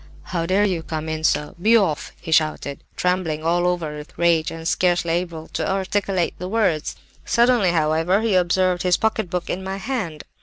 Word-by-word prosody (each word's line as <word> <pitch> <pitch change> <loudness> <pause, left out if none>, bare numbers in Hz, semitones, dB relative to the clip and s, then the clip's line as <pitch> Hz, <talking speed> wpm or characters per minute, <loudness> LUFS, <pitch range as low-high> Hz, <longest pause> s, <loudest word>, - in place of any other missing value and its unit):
"'How 165 -2 -3
dare 195 +3 +3
you 180 -5 0
come 160 -1 -5
in 155 0 -3
so? 150 -1 +1
Be 225 +4 +6
off!' 175 -9 0
he 165 - -7
shouted, 155 -3 +1
trembling 180 -4 -1
all 175 +2 +2
over 170 -4 -1
with 150 0 -11
rage 165 -3 +2
and 165 0 -6
scarcely 175 -1 +1
able 170 -2 -3
to - - -2
articulate 190 -1 0
the 180 +1 -5
words. 195 -8 0 0.3
Suddenly, 235 -5 +3
however, 165 +4 +2
he 225 -2 +1
observed 180 0 +2
his 180 -1 +3
pocketbook 215 -5 -1
in 190 - -3
my 190 +1 -4
hand. 195 - -4
175 Hz, 180 wpm, -22 LUFS, 160-190 Hz, 0.3 s, Be